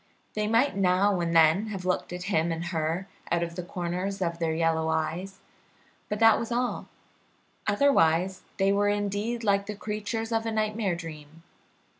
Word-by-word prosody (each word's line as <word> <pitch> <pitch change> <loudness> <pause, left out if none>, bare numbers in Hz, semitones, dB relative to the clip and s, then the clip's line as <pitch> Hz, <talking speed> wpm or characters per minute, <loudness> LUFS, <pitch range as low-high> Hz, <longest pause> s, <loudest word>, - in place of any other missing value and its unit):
They 210 0 -1
might 230 +1 +2
now 190 0 +3
and 170 -1 -1
then 165 +6 +5
have 195 -4 -5
looked 180 -1 -1
at 180 0 -5
him 170 -3 +1
and 165 +1 -3
her 170 +2 -2 0.2
out 170 0 +2
of 170 0 -4
the 180 - -3
corners 180 +2 -3
of 170 -2 -2
their 160 -1 0
yellow 160 -1 +1
eyes, 170 +5 -2 0.7
but 210 - -1
that 225 -1 +6
was 230 - -4
all; 245 +1 -1 0.8
otherwise 190 - +3 0.2
they 195 0 +3
were 205 +1 +2
indeed 205 +3 -1
like 200 -1 +2
the 210 - -4
creatures 215 +2 -4
of 225 0 0
a - - -1
nightmare 215 -3 0
dream. 160 -1 -10
190 Hz, 170 wpm, -27 LUFS, 170-210 Hz, 0.8 s, that